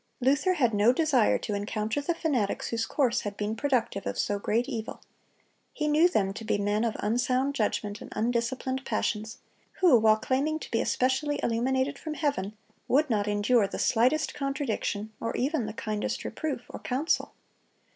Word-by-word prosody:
Luther 280 +8 +3
had 245 -8 +2
no 210 +3 +5
desire 265 -5 +3
to 210 - -4
encounter 215 +5 -2
the 335 +4 -1
fanatics 260 -12 -1
whose 230 -1 -1
course 260 -5 +1
had 205 -1 -5
been 210 +1 -2
productive 235 -6 -1
of - - -3
so 205 0 0
great 230 +4 0
evil. 225 0 -5 0.7
He 300 - -2
knew 310 +4 +5
them 195 - +1
to 220 - -7
be 215 - 0
men 205 +2 0
of 230 -2 0
unsound 255 +5 +1
judgment 210 -3 -2
and - - -10
undisciplined 245 +3 -1
passions, 220 -3 -2 0.4
who, 340 -11 +5
while 215 0 +5
claiming 275 +7 0
to - - -9
be 230 - +2
especially 275 +3 0
illuminated 260 +4 0
from 310 -1 -5
heaven, 220 -10 -2 0.3
would 290 0 +2
not 210 -2 +1
endure 205 +1 +3
the - - -6
slightest 255 +7 +2
contradiction, 265 -6 -2
or 230 - -3
even 265 -3 0
the - - -4
kindest 215 -1 -3
reproof 295 -6 -3
or - - -7
counsel. 275 +7 -1
240 Hz, 170 wpm, -28 LUFS, 215-280 Hz, 0.7 s, no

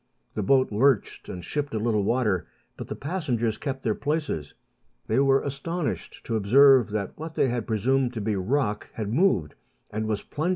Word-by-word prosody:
The 105 - -2
boat 130 +4 +3
lurched 125 +1 +1
and 90 -2 -6
shipped 145 +3 -3
a - - 0
little 110 -1 +1
water, 105 -5 +1 0.3
but - - -7
the - - -5
passengers 130 - -2
kept 135 -2 -4
their 110 - +1
places. 145 - -3 0.5
They 115 - +1
were 135 0 +4
astonished 150 +4 -4
to 115 - -2
observe 130 +4 +6
that 105 -2 -3
what 160 0 -6
they 130 - +2
had 120 -2 -2
presumed 125 +3 +1
to 115 - -4
be 105 0 0
rock 105 +2 -1
had 110 -1 -4
moved, 130 - +2 0.4
and 110 +1 -2
was 105 -2 -1
plunging 155 +4 -2
120 Hz, 180 wpm, -26 LUFS, 105-140 Hz, 0.5 s, observe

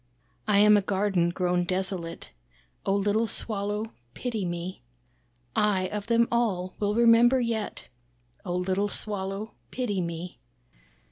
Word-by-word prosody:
"I 210 -2 +4
am 210 +1 +7
a - - +3
garden 190 -3 +1
grown 180 0 +1
desolate, 185 - -3 0.6
Oh 195 - +3
little 205 +3 +1
Swallow 210 0 -2 0.2
pity 225 -6 -2
me. 175 +2 -4 0.7
I 200 -3 +2
of 210 -1 -4
them 235 0 +4
all, 195 -6 0
will 205 0 0
remember 235 +2 +6
yet, 230 -3 -3 0.6
Oh 180 -2 -3
little 190 +3 0
Swallow 200 +1 -3 0.2
pity 210 -7 -1
me. 170 +1 -5
200 Hz, 125 wpm, -27 LUFS, 185-220 Hz, 0.7 s, am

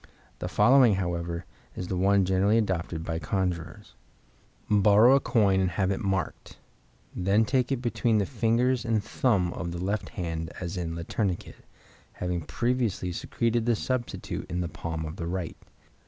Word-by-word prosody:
The - - -3
following, 125 -4 +5
however, 85 -2 -3 0.3
is 90 - -5
the 95 - -2
one 100 +1 +3
generally 95 +4 +3
adopted 90 -6 -1
by 80 -1 -2
conjurers: 90 -4 -3 0.7
Borrow 105 +4 +6
a 135 - +6
coin 105 -7 +2
and 95 -1 +2
have 95 +2 0
it 95 - -1
marked. 95 -3 -3 0.6
Then 100 +4 +2
take 130 +1 +1
it 130 -2 -1
between 115 -2 +1
the 100 - +2
fingers 120 +2 +1
and 115 -3 0
thumb 100 -8 +1
of 85 - -4
the 85 - -5
left 100 +5 -2
hand, 80 -4 -4
as 90 +1 -4
in 85 -2 -3
"Le 85 - -5
Tourniquet", 95 0 -2 0.6
having 90 -1 -2
previously 115 -1 -1
secreted 115 +5 -1
the 120 - +4
substitute 125 +2 -3
in 90 +2 -2
the 85 - -2
palm 80 -1 -5
of 80 +3 -7
the 85 - -4
right. 90 -1 -3
95 Hz, 165 wpm, -27 LUFS, 85-115 Hz, 0.7 s, Borrow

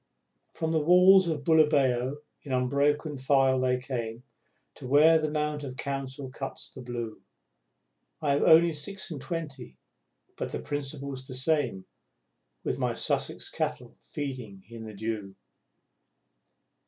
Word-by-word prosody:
From 160 -1 -2
the 160 - +2
walls 180 +4 +6
of 155 -3 -2
Bulawayo 145 -4 +3 0.2
in 140 - -9
unbroken 140 +3 +1
file 135 -1 +3
they 130 0 +2
came 120 -2 -5 0.5
To - - -9
where 155 +4 +6
the 155 -1 -1
Mount 150 -1 -2
of 130 -2 -7
Council 135 -1 -4
cuts 135 +1 -6
the - - -10
blue... 120 -3 -5 1.0
I 150 -3 0
have 140 - +2
only 165 +1 +6
six 185 +6 -6
and 145 -4 -5
twenty, 145 - -6 0.6
but - - -4
the - - -3
principle's 140 -2 -5
the 130 - -7
same 130 - 0 0.8
With - - -2
my - - 0
Sussex - - -1
Cattle - - -3
feeding 125 -9 -6
in 115 -1 -9
the 110 -1 -9
dew! 105 -2 -4
140 Hz, 135 wpm, -28 LUFS, 125-150 Hz, 1.0 s, walls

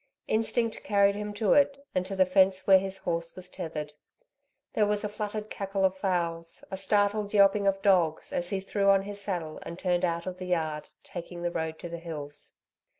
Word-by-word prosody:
Instinct 225 +1 0
carried 200 -1 +4
him 210 +1 -4
to 205 -1 +3
it, 280 -1 +3
and 185 - +1
to 195 - -4
the 190 -1 +5
fence 190 0 +3
where 190 -1 +7
his 190 0 -3
horse 170 -2 -3
was 185 -1 -9
tethered. 155 -4 -5 0.8
There 210 -1 +3
was 210 0 0
a - - 0
fluttered 210 0 -5
cackle 195 -1 -1
of 190 0 +2
fowls, 170 -3 -2
a 190 - -3
startled 205 +1 +1
yelping 200 0 +5
of 195 0 +1
dogs, 175 -6 +2
as 175 0 -1
he 195 -1 -1
threw 200 +1 +1
on 195 0 +5
his 200 0 -6
saddle 175 -6 -3
and 170 - -7
turned 180 -1 0
out 170 -1 0
of 185 0 -5
the 185 - -5
yard, 155 -4 -1 0.2
taking 175 0 -7
the 175 - 0
road 160 -1 -3
to 175 - -7
the 170 0 -6
hills. 150 -3 -7
190 Hz, 205 wpm, -28 LUFS, 170-205 Hz, 0.8 s, where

